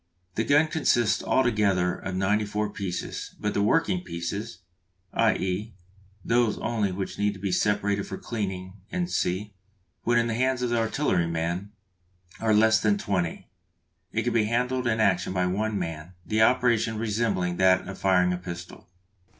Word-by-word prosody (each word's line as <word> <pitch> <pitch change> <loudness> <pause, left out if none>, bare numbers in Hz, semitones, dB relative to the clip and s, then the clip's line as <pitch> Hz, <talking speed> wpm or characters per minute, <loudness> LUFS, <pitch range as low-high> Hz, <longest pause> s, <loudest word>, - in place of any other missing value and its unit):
The 110 - 0
gun 145 +6 +4
consists 120 -9 +2
altogether 105 -8 +2
of 95 -1 -5
ninety 100 +3 +2
four 105 0 -2
pieces, 95 -4 -5
but 105 - -1
the 100 - +1
working 165 - +2
pieces, 90 - -5 0.5
i.e. 105 -1 0 0.5
those 115 -2 +2
only 110 -4 -1
which 95 +1 -5
need 105 -1 0
be 100 0 -2
separated 100 +1 +1
for 95 - -5
cleaning, 95 -5 -4 0.3
&c., 105 - -2 0.5
when 120 0 +2
in 120 - +3
the 115 - -1
hands 130 +1 +1
of 120 - 0
the 120 - +2
artilleryman, 90 - 0 0.7
are 110 -1 +1
less 110 +1 +5
than 105 -2 +3
twenty. 95 -5 -2 0.6
It - - -1
can - - 0
be 115 -2 +3
handled 125 +2 0
in 110 -1 +1
action 95 -4 +2
by 90 -1 +1
one 105 +3 -1
man, 80 -1 -5
the 110 0 +1
operation 120 -2 +3
resembling 105 -5 0
that 95 -1 +4
of 100 - -7
firing 90 -2 +3
a - - -2
pistol. 85 0 -9
105 Hz, 155 wpm, -26 LUFS, 95-115 Hz, 0.7 s, less